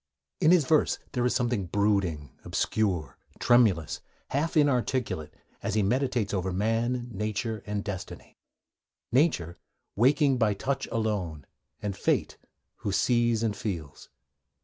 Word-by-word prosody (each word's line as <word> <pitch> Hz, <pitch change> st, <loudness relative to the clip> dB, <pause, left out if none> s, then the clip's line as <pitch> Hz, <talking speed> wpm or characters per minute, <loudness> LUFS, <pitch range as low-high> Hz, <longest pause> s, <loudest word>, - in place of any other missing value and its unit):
In 155 Hz, -, +4 dB
his 175 Hz, -5 st, +5 dB
verse 155 Hz, +3 st, +3 dB
there 125 Hz, -3 st, -1 dB
is -, -, 0 dB
something 120 Hz, -6 st, 0 dB
brooding, 100 Hz, -6 st, 0 dB
obscure, 90 Hz, -10 st, -1 dB, 0.2 s
tremulous, 110 Hz, -10 st, +3 dB, 0.3 s
half 155 Hz, +4 st, 0 dB
inarticulate, 130 Hz, -, +1 dB, 0.3 s
as -, -, -2 dB
he 105 Hz, -, +3 dB
meditates 120 Hz, -1 st, 0 dB
over 95 Hz, -1 st, -1 dB
man, 115 Hz, +5 st, 0 dB
nature, 110 Hz, +1 st, -3 dB
and 105 Hz, -1 st, -2 dB
destiny: 100 Hz, -4 st, -7 dB, 0.7 s
Nature, 120 Hz, -, +1 dB, 0.4 s
'waking 135 Hz, +3 st, +3 dB
by 105 Hz, -3 st, +2 dB
touch 135 Hz, +6 st, -2 dB
alone,' 100 Hz, -10 st, -2 dB, 0.4 s
and 100 Hz, -2 st, -2 dB
Fate, -, -, 0 dB, 0.4 s
who 100 Hz, -, -3 dB
sees 120 Hz, +2 st, +2 dB
and 110 Hz, -2 st, 0 dB
feels. 80 Hz, -9 st, -5 dB
110 Hz, 125 wpm, -28 LUFS, 95-125 Hz, 0.7 s, his